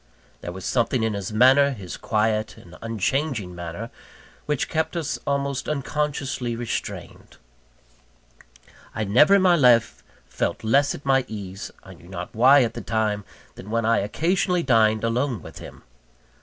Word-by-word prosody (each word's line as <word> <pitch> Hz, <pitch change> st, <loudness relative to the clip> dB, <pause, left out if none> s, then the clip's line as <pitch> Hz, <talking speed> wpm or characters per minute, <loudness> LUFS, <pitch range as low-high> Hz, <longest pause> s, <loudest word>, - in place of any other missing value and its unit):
There 85 Hz, -, -6 dB
was 95 Hz, 0 st, -8 dB
something 120 Hz, -1 st, +1 dB
in 110 Hz, -1 st, 0 dB
his 100 Hz, 0 st, -4 dB
manner, 135 Hz, +5 st, +5 dB
his 95 Hz, -7 st, -8 dB
quiet 110 Hz, 0 st, -1 dB
and 85 Hz, -2 st, -14 dB
unchanging 115 Hz, -, -2 dB
manner, 85 Hz, +6 st, -7 dB, 0.6 s
which 150 Hz, -3 st, -1 dB
kept 160 Hz, +1 st, -2 dB
us 160 Hz, -4 st, -3 dB
almost 140 Hz, -1 st, -1 dB
unconsciously 140 Hz, -4 st, -2 dB
restrained. 115 Hz, -1 st, -6 dB, 1.6 s
I 110 Hz, -, -1 dB
never 125 Hz, -, +5 dB
in 195 Hz, -, +3 dB
my 180 Hz, -2 st, +5 dB
life 120 Hz, -, +3 dB, 0.2 s
felt -, -, -3 dB
less 140 Hz, +6 st, +2 dB
at 140 Hz, -, -12 dB
my 135 Hz, -1 st, +3 dB
ease 100 Hz, -2 st, -7 dB
I -, -, -12 dB
knew 85 Hz, -, -17 dB
not 90 Hz, -1 st, -7 dB
why 130 Hz, +4 st, +6 dB
at 115 Hz, -, -2 dB
the -, -, -6 dB
time 110 Hz, -3 st, -1 dB, 0.3 s
than 100 Hz, -, -11 dB
when 115 Hz, 0 st, 0 dB
I 115 Hz, 0 st, +3 dB
occasionally 175 Hz, -, 0 dB
dined 110 Hz, -4 st, +3 dB
alone 115 Hz, -, -1 dB
with -, -, -10 dB
him. -, -, -12 dB
115 Hz, 155 wpm, -24 LUFS, 105-140 Hz, 1.6 s, why